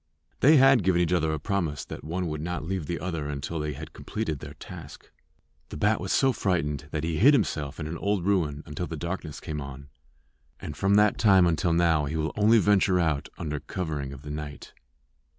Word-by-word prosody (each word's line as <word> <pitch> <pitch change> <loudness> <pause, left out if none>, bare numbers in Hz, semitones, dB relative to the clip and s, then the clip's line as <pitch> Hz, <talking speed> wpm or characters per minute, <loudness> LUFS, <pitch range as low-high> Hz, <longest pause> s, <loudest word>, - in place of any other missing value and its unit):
They 150 +4 +6
had 135 -2 +6
given 90 -1 +2
each 90 0 +2
other 80 -3 +2
a 80 - -1
promise 85 -7 -2
that - - -8
one 90 +5 -3
would 75 -2 -3
not 85 -1 -4
leave 90 -4 -3
the 85 - -3
other 80 -5 -3
until 75 +3 -4
they 75 0 -2
had - - -9
completed 105 -10 -4
their 75 +1 -9
task. 80 -1 -11 0.6
The - - -7
bat 105 +6 +2
was 95 - -3
so 135 -1 +3
frightened 75 - -1
that 75 0 -3
he 80 -1 -1
hid 140 +8 +7
himself 75 - -1
in 75 - -3
an 80 +2 -5
old 100 -3 0
ruin 80 -8 0
until 75 +4 -5
the 80 - -5
darkness 85 -3 -5
came 75 -1 -5
on; 70 +1 -9 0.7
and 75 - -7
from 100 +3 +2
that 105 0 +4
time 95 -4 +6
until 85 0 +1
now 85 -3 +3
he 75 +3 -3
will 80 0 -2
only 110 +2 +5
venture 100 -3 +3
out 75 -4 0
under 75 -3 -3
covering 75 -4 -4
of 70 0 -10
the 75 - -7
night. 75 -1 -7
85 Hz, 210 wpm, -27 LUFS, 75-95 Hz, 0.7 s, hid